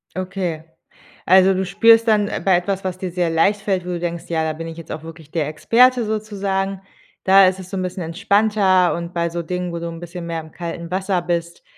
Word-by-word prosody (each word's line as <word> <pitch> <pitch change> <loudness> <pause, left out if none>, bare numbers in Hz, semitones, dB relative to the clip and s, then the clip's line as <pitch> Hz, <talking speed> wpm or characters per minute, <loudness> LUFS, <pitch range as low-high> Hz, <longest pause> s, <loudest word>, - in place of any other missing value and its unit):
Okay. 185 -4 -3 0.6
Also 190 +1 +6
du 190 0 -1
spürst 225 +4 +5
dann, 210 -2 +3
äh, - - -4
bei 190 -2 +4
etwas, 195 +2 -2
was 185 -1 -3
dir 185 -1 -5
sehr 175 -1 0
leicht 195 +6 +2
fällt, 190 -3 -1
wo - - -6
du 175 -1 -2
denkst, 170 0 -4
ja, 160 -1 0
da 155 - -1
bin 165 +1 -7
ich 165 0 -8
jetzt 165 - -9
auch 155 0 -6
wirklich 160 -2 -12
der 155 -4 -1
Experte 240 +10 +3
sozusagen, 195 -3 -2 0.4
da 195 0 +7
ist 185 +1 -1
es 185 -1 -10
so 195 - -4
'n 185 - -2
bisschen 185 0 -4
entspannter 195 +1 +2
und 170 +1 -6
bei 170 0 0
so 170 0 -4
Dingen, 180 +1 -3
wo 170 - -4
du 170 - -5
'n 165 0 -8
bisschen 175 0 -8
mehr 165 -1 -3
im 160 0 -14
kalten 170 0 -6
Wasser 190 -1 0
bist, 170 -1 -3
180 Hz, 235 wpm, -20 LUFS, 170-195 Hz, 0.6 s, da